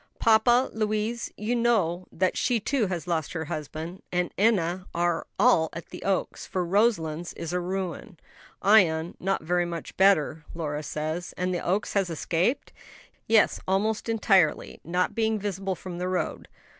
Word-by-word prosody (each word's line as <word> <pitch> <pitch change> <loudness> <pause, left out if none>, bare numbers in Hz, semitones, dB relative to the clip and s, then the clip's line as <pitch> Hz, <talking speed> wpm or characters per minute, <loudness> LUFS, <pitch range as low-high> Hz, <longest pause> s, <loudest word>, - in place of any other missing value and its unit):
"Papa, 240 +3 +4
Louise 215 +2 -1
you 220 +4 -1
know 195 -7 +1
that 185 +2 0
she 245 -2 +1
too 235 0 0
has 180 -2 -3
lost 165 -4 -2
her 160 -2 -3
husband 155 +4 -6
and 180 -1 -1
Enna 185 -4 +1
are 175 -1 0
all 175 -11 +4
at 170 - -8
the - - -9
Oaks; 195 -1 -1
for 185 -1 -1
Roselands 175 -5 +1
is 170 +1 -6
a 180 - +1
ruin, 185 +2 -4 0.5
Ion 175 -6 +4
not 195 -3 -1
very 175 +2 +1
much 170 -2 -6
better, 160 -5 +3
Lora 150 -3 -3
says." 155 +3 -4
"And 180 0 -1
the 175 - -2
Oaks 195 +4 -1
has 195 -3 +1
escaped?" 170 - -1 0.5
"Yes, 220 -2 +4
almost 210 +4 0
entirely; 195 -8 +2
not 180 +3 0
being 220 -1 +1
visible 195 -2 -3
from 175 -1 -8
the 180 - -2
road. 180 -3 -2
185 Hz, 155 wpm, -26 LUFS, 170-210 Hz, 0.5 s, Papa